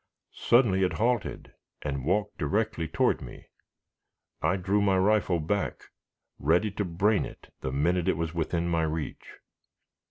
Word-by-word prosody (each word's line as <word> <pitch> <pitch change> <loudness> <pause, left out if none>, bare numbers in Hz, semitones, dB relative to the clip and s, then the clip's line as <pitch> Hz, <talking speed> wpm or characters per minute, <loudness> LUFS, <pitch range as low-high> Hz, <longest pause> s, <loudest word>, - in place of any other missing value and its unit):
Suddenly 115 -6 +3
it 90 - +1
halted 120 +1 -1 0.3
and 70 -2 -3
walked 105 +7 0
directly 100 +1 0
toward - - +1
me. - - -10 1.0
I 85 +4 +2
drew 95 +2 +1
my 100 -2 +3
rifle 95 -2 +2
back, 95 +6 -2 0.6
ready 85 +8 +2
to 105 - -2
brain 95 +5 +2
it - - -11
the 65 - -3
minute 85 +6 +1
it 95 - +2
was 80 -1 -2
within 85 +1 -1
my 85 -1 +1
reach. 80 -1 -3
90 Hz, 140 wpm, -28 LUFS, 80-105 Hz, 1.0 s, Suddenly